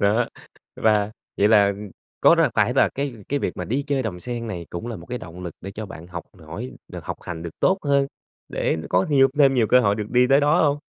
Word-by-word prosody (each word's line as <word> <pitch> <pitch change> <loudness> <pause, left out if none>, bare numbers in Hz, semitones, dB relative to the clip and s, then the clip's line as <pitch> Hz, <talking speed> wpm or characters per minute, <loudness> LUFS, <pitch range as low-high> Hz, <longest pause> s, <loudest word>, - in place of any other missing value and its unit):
Đó, 110 +4 +2 0.5
và 105 -1 +2 0.2
vậy 105 - +4 0.7
có - - +7
là - - +3
phải - - +2
là - - +4
cái 140 -2 -4
cái 145 - 0
việc - - -3
mà - - -4
đi 135 +5 -1
chơi 140 -2 0
Đầm 90 -6 -4
Sen 120 +1 -5
này 90 -6 -5
cũng 90 +7 -5
là 115 -3 -4
một 85 - -12
cái 125 0 -4
động 90 +2 -10
lực 85 -3 -6
để 95 - -7
cho 105 +1 -6
bạn 85 -2 -10
học 85 -2 -7 0.2
hỏi 65 - -6 0.2
được - - -8
học - - -4
hành 85 -2 -6
được 85 - -5
tốt 190 +1 +3
hơn, 140 -1 +3 0.4
để - - -1
có 90 +1 +2
nhiều 135 -2 +5
thêm 135 -2 +6
nhiều 115 -3 +3
cơ 125 +3 +5
hội 100 -3 +2
được 105 -1 -5
đi 125 0 +4
tới 135 +1 +5
đó 150 +4 +3
hông? 145 -1 +2
115 Hz, 245 wpm, -23 LUFS, 95-135 Hz, 0.7 s, có